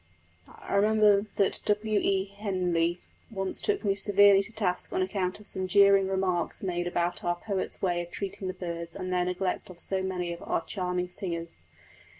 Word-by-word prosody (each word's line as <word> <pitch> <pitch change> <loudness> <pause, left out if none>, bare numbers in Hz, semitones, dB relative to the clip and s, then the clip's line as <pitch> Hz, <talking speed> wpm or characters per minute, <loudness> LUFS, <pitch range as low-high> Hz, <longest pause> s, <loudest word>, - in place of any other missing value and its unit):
I - - -9
remember 210 0 +4
that 200 - +2
W. 210 0 +2
E. 195 -1 +1
Henley 180 -4 -1 0.3
once 195 -4 -3
took 410 - -1
me 200 - +3
severely 200 0 +5
to 200 - -5
task 195 -5 -1
on 185 - +1
account 185 0 -2
of 210 - -14
some 185 -2 -1
jeering 200 0 +5
remarks 190 -3 -1
made 175 -2 -1
about 175 0 -1
our 175 0 +1
poet's 195 +2 -4
way 175 -2 +1
of 175 - -7
treating 195 0 -5
the 185 - -4
birds 170 -2 -5
and 185 -1 -4
their 180 0 +2
neglect 180 +1 -2
of 180 -2 -12
so 190 +1 -2
many 180 -2 -2
of 170 - -10
our 165 - -2
charming 180 -2 -2
singers. 170 -2 -4
190 Hz, 180 wpm, -28 LUFS, 180-200 Hz, 0.3 s, severely